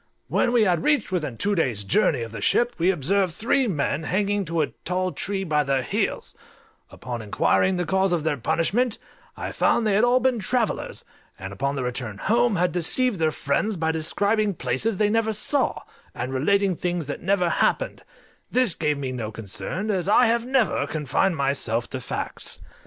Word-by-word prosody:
When 240 - +2
we 240 -2 +4
had 175 -5 +2
reached 295 -10 +1
within 150 -10 -2
two 205 - 0
days' 125 - 0
journey 125 - +2
of 115 - -7
the 115 - -7
ship 240 0 +3
we 175 +3 +3
observed 185 +2 +1
three 255 +3 +1
men 145 -5 -1
hanging 200 +3 0
to 165 -1 -1
a 150 - -1
tall 185 +1 -1
tree 195 +1 -3
by 150 -4 +1
their 135 -2 0
heels; - - -2 0.6
upon 120 -1 -6
inquiring 180 - +1
the 175 - -1
cause 190 +1 +1
of 170 -3 0
their 155 -2 0
punishment, 205 - 0 0.4
I - - -4
found 235 - +2
they 210 - +2
had 210 +4 +3
all 245 +1 +4
been 255 -2 +1
travellers, 230 +3 -1 0.3
and 95 +1 -7
upon 140 +7 -2
their 130 -2 -2
return 120 -4 -4
home 235 - +2
had 180 0 +1
deceived 195 +5 +1
their 160 -1 +3
friends 155 +8 -1
by 160 0 0
describing 200 +6 0
places 130 - -1
they 210 0 +2
never 220 0 +1
saw, 255 +6 0 0.3
and 130 +2 -4
relating 195 +8 +2
things 175 -1 -2
that 145 - -5
never 185 -1 +1
happened: - - 0 0.5
this 250 -7 +2
gave 150 -2 -1
me 135 -2 -3
no 115 -4 -4
concern, 115 - -4
as 190 -1 -1
I 245 +4 +6
have 235 +1 +1
ever 245 - +1
confined 155 +4 0
myself 135 -4 -1
to 130 - -4
facts. - - -6
180 Hz, 185 wpm, -24 LUFS, 140-215 Hz, 0.6 s, I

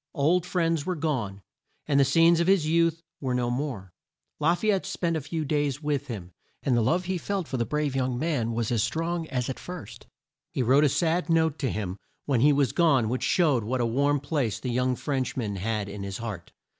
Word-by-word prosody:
Old 170 +4 +2
friends 165 -4 +1
were 185 +3 -2
gone, 120 - -2 0.4
and 140 -1 +2
the 140 - +5
scenes 165 +4 +5
of 170 - +1
his 190 -5 +4
youth 165 +1 +2 0.2
were 130 -3 -1
no 120 -1 0
more. 120 -9 -4 0.5
La 160 +3 +3
fay 215 +4 +1
ette 195 -2 0
spent 170 -3 -1
a 160 - -1
few 155 +2 -3
days 145 0 -1
with 145 -1 -1
him, 95 -8 -6 0.3
and 130 - +2
the 120 - +3
love 175 +11 +1
he 185 0 -1
felt 190 0 -2
for 130 - -3
the 115 - -1
brave 150 -2 -1
young 130 -2 0
man 130 -6 0
was 115 0 -1
as 115 -3 +2
strong 165 +8 -1
as 125 -4 -2
at 130 - -4
first. 180 - -9 0.4
He 130 - -1
wrote 135 +5 +4
a - - +4
sad 170 +4 0
note 160 -2 +2
to 135 - 0
him 100 -4 -3 0.3
when 130 -5 +1
he 145 +3 +6
was 140 -5 +2
gone 140 -10 +3
which 125 +2 -1
showed 150 - +2
what 125 +4 -1
a 120 - +2
warm 140 +5 +2
place 140 -6 -1
the 125 - -3
young 125 +1 +1
French 135 -1 -2
man 105 -5 -2
had 105 +1 -2
in 100 0 -7
his 100 -1 -4
heart. 105 -7 -6
140 Hz, 225 wpm, -27 LUFS, 120-165 Hz, 0.5 s, he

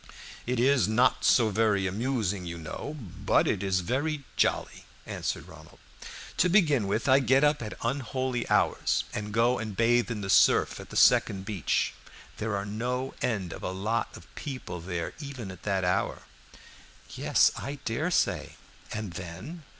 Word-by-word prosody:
"It 125 -1 0
is 130 0 +4
not 120 +4 +3
so 115 -3 +5
very 105 -2 +2
amusing, 100 -3 -1
you 85 0 -5
know, 85 - -6
but 100 -9 0
it - - 0
is 95 -2 +1
very 140 - -1
jolly," - - 0 0.2
answered - - -4
Ronald. - - -14 0.6
"To 180 - +4
begin 150 - +3
with, 110 +6 -1
I 130 0 +6
get 135 +1 +3
up 150 -1 +3
at 110 -2 -5
unholy 130 0 -2
hours - - +2
and 105 0 -4
go 120 +3 +2
and 110 -3 -5
bathe 120 +1 +3
in 110 -3 -3
the 95 - -5
surf - - +4
at - - -10
the - - -5
second 95 -1 +4
beach. 100 -6 0 0.4
There 110 -1 -2
are 100 0 -2
no 125 +5 -3
end 100 -8 -1
of - - -9
a - - -1
a 95 +1 -4
lot 110 +4 -1
of - - -14
people 125 - -6
there 90 -1 -4
even 135 -9 -6
at 90 - -12
that 95 -1 +1
hour." 90 - 0 0.9
"Yes, - - +3
I 140 +1 -5
dare 125 +10 -1
say. 180 - 0 0.4
And 105 -4 -4
then?" 95 - -7
115 Hz, 170 wpm, -28 LUFS, 95-130 Hz, 0.9 s, I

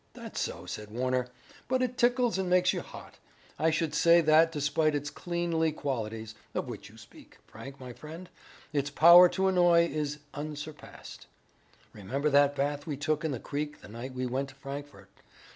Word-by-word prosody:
"That's - - -7
so," - - -4
said 105 -1 -7
Warner, 125 +2 -1 0.4
"but 255 0 +1
it 250 0 -2
tickles 245 -3 +2
and 185 -1 -1
makes 180 0 +3
you - - -3
hot. - - -12 0.4
I 160 - +3
should 160 0 -1
say 170 0 +5
that 160 +1 +5
despite 150 0 +1
its 145 +1 -3
cleanly 170 -2 -1
qualities, 115 -7 -4 0.2
of - - -2
which - - -8
you - - -17
speak, - - -16
Frank, 135 0 -11
my 125 -2 -8
friend, 160 +7 -10 0.5
its 145 -1 0
power 170 +4 +8
to 190 +1 0
annoy 175 -2 +5
is 150 -2 -3 0.2
unsurpassed. 150 0 -8 0.7
Remember 135 +9 -2
that 145 0 +4
bath 145 +2 -2
we 145 -3 -3
took 150 +1 -1
in 160 - 0
the 130 -5 -3
creek 150 +3 -5
the - - -13
night 120 +4 -8
we 130 0 -2
went 135 +2 -2
to 135 - -15
Frankfort. 135 -7 -9
150 Hz, 175 wpm, -29 LUFS, 135-170 Hz, 0.7 s, power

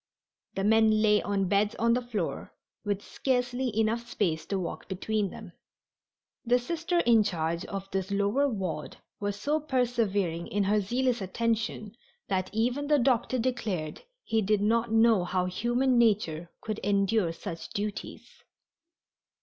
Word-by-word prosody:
The 195 - -1
men 220 0 +4
lay 210 -1 +4
on 200 -2 0
beds 205 +3 +2
on 230 0 +2
the 250 - +1
floor, 220 -8 -4 0.3
with 205 -1 -2
scarcely 250 -1 -1
enough 230 +2 0
space 165 -9 -1
to 195 - -1
walk 180 -3 -5
between 200 +2 -1
them. 205 -2 -10 0.9
The 245 +1 +3
Sister 335 +7 -1
in 230 -2 +5
charge 170 -4 -1
of 195 -1 -5
this 190 0 -2
lower 205 +8 +2
ward 185 - -4 0.2
was 205 -1 -2
so 295 +8 +1
persevering 230 - 0
in 205 0 0
her 205 +2 +2
zealous 245 +3 0
attention 220 +1 -2 0.3
that 185 -1 0
even 245 +6 0
the 300 0 +4
doctor 255 -1 +2
declared 220 -11 -2 0.2
he 225 -1 +1
did 210 0 +1
not 230 +2 +2
know 225 -3 +5
how 180 0 0
human 240 +7 +1
nature 185 -8 +1
could 215 -1 -4
endure 200 -2 +2
such 165 0 -7
duties. 205 0 -5
215 Hz, 145 wpm, -28 LUFS, 195-240 Hz, 0.9 s, in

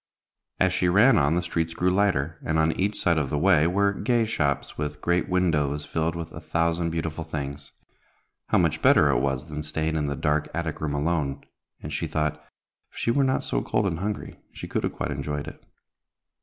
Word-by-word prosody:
As 95 -1 +3
she 90 -1 +2
ran 110 +7 +6
on, 70 +3 +2
the 90 - 0
streets 80 -1 -2
grew 90 +2 +2
lighter, 90 -5 +1
and 80 - 0
on 80 0 +3
each 100 +5 -1
side 85 -3 +2
of 70 -3 -2
the 75 - -1
way 85 -1 +4
were 100 +3 +2
gay 115 +3 +1
shops, 70 -9 -1
with 75 0 -4
great 85 +2 0
windows 75 -6 +1
filled 80 +1 -1
with 85 -1 -6
a 80 - -8
thousand 85 +1 0
beautiful 80 0 -3
things. 70 -3 -6 0.7
How - - +3
much - - +1
better - - +5
it - - +2
was 65 +1 -1
than 75 0 -5
staying 80 +1 -2
in 75 -2 0
the 70 - -2
dark 75 0 0
attic 85 -2 -3
room 75 -2 -1
alone; 75 -2 -1 0.4
and - - -5
she - - -2
thought, 75 0 -2 0.5
if - - -17
she 115 - +1
were 140 +3 +2
not 130 0 +1
so - - -1
cold 110 - 0
and 85 -4 -1
hungry, 105 +2 -4
she - - -8
could - - -2
have - - -1
quite - - -3
enjoyed 70 +1 -3
it. - - -10
80 Hz, 210 wpm, -25 LUFS, 75-90 Hz, 0.7 s, ran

